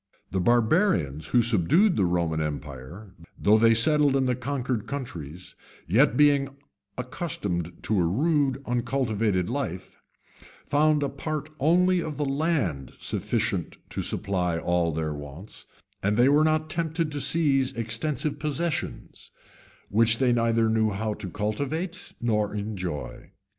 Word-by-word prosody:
The 95 - 0
barbarians 110 - +2
who 120 +4 +3
subdued 120 - +3
the 95 - +2
Roman 85 -3 0
empire, 75 +6 -6 0.2
though 105 +2 +4
they 115 0 +5
settled 145 +3 +4
in 135 -1 +2
the 125 -1 +1
conquered 125 -3 -3
countries, 90 - -7 0.3
yet 125 - +3
being 145 -2 +4 0.5
accustomed 105 - -4
to 105 -3 +1
a 85 - +2
rude, 140 - +1
uncultivated 115 -6 0
life, 120 -9 -5 0.6
found 150 0 +2
a 140 - 0
part 155 +2 -5
only 180 +5 +3
of 155 -3 -5
the 150 - -1
land 135 - -1
sufficient - - -2
to - - -3
supply 90 -5 -1
all 85 0 0
their 80 -1 -2
wants; 75 +7 -10 0.3
and 105 +2 0
they 125 +2 +5
were 145 +2 +4
not 155 0 +1
tempted 160 -1 -1
to 145 -1 -3
seize 135 -2 +3
extensive 140 +6 -2
possessions, 155 +2 -4 0.6
which 115 +2 +4
they 125 -1 +2
knew 120 - +1
neither 115 -1 +2 0.2
how 110 +1 -2
to 95 - -7
cultivate 140 - -4
nor 105 -3 0
enjoy. 95 -7 -5
120 Hz, 135 wpm, -26 LUFS, 95-145 Hz, 0.6 s, they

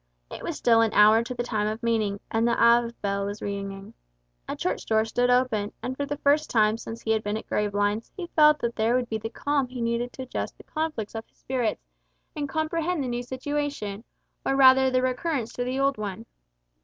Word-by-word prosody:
It - - -7
was 335 - -4
still 230 -1 +4
an 225 -1 +1
hour 215 +2 +6
to 250 +2 -6
the 240 - -2
time 215 -3 -1
of 215 +2 -4
meeting, 215 -4 0
and 225 +1 +2
the 235 - +1
Ave 235 0 +4
bell 200 0 -1
was 205 +1 -5
ringing. 195 -1 -5 0.5
A - - -3
church - - -2
door 220 0 +3
stood 245 +2 +1
open, 245 -5 +1
and 255 - -3
for 285 +1 -3
the 290 0 -3
first 295 +2 +2
time 215 -1 +3
since 230 0 -8
he 220 - 0
had 220 -1 +2
been 205 +1 -2
at - - -8
Gravelines 205 +1 -1
he 360 - -4
felt 300 -1 +6
that 235 0 -2
there 225 +2 +2
would 250 -1 0
be 220 - -2
the 225 - -5
calm 285 +2 -1
he 250 0 -8
needed 235 +1 -1
to 260 - -6
adjust 255 - -5
the - - -14
conflict 310 -10 -3
of 225 0 -6
his - - -37
spirits, 245 - -2 0.5
and 290 -2 -3
comprehend 315 +2 -1
the - - -3
new 240 0 -2
situation, 260 -5 -4 0.4
or 270 - +1
rather 265 -1 +7
the 255 0 +1
recurrence 255 -1 -1
to 245 - -2
the 255 +2 -2
old 275 -4 +1
one. 210 +1 -5
235 Hz, 220 wpm, -26 LUFS, 215-265 Hz, 0.5 s, rather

